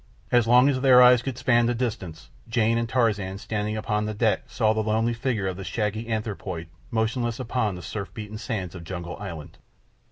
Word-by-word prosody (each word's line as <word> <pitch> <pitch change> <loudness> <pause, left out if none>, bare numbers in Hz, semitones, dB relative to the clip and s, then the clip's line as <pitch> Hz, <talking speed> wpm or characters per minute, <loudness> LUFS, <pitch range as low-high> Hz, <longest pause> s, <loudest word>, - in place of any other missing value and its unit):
And 120 - +6
as 115 - -1
long 125 +3 +6
as 130 -2 +1
their 130 -2 +7
eyes 125 -1 +7
could 130 -1 -4
span 120 -3 +3
the 120 - 0
distance, 95 -10 -4 0.2
Jane 115 0 +2
and 115 -1 -2
Tarzan, 105 -6 0
standing 105 +1 -3
upon 105 0 -1
the 110 - -4
deck, 110 0 +1
saw 110 -3 +1
the 110 - 0
lonely 110 +2 +1
figure 115 -4 -2
of 95 -1 -3
the 95 - -6
shaggy 110 +3 -2
anthropoid 100 -6 -4 0.2
motionless 115 +1 -1
upon 115 -5 -1
the 90 - -9
surf 95 +1 -5
beaten 110 -1 -7
sands 100 -5 -4
of 90 -2 -9
Jungle 85 0 -6
Island. 85 -7 -8
110 Hz, 200 wpm, -25 LUFS, 100-120 Hz, 0.2 s, their